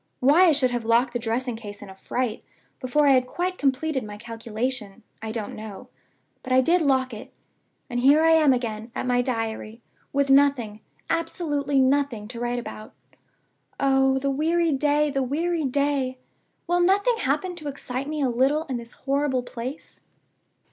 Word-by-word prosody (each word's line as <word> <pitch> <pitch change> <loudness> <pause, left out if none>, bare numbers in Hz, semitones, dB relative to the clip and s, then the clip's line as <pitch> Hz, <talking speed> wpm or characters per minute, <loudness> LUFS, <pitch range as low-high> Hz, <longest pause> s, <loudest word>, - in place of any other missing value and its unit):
Why 295 +8 +5
I 340 - +6
should 265 -4 +2
have 240 -1 -2
locked 235 +2 +2
the 240 - -1
dressing 235 +1 -2
case 205 -2 -9
in - - -10
a 190 - -10
fright, 235 +4 -3 0.4
before 275 +4 +1
I 280 - +6
had 255 -1 +3
quite 365 +6 -3
completed 275 0 0
my 210 -1 -8
calculation, 230 -1 -5 0.2
I 220 0 -4
don't 220 -2 -5
know; 215 -2 -9 0.5
but 255 - -8
I 255 - +6
did 340 +7 +3
lock 260 -4 +1
it. 220 +2 -9 0.6
And 245 -1 -3
here 285 +5 +5
I 325 - +5
am 315 -3 +5
back 260 - +5
again 220 0 -5
at - - -3
my 245 0 +2
Diary, 225 -2 -3 0.3
with 280 -1 +1
nothing, 270 -7 +3 0.3
absolutely 295 -4 -1
nothing, 260 -5 +1
to 235 -1 -7
write 240 0 -2
about. 215 -2 -8 0.8
Oh, 270 -1 +3
the 275 +1 0
weary 325 +4 +1
day! 295 +1 +2
the 275 -1 0
weary 315 +5 -1
day! 275 -1 0 0.5
Will 350 +1 +1
nothing 405 +6 +3
happen 350 +4 -1
to 310 -3 -7
excite 275 0 -5
me 305 -2 -2
a - - +3
little 265 +6 +2
in 265 -6 -4
this 235 0 -9
horrible 275 -2 0
place?" 250 +4 -8
265 Hz, 175 wpm, -24 LUFS, 240-290 Hz, 0.8 s, I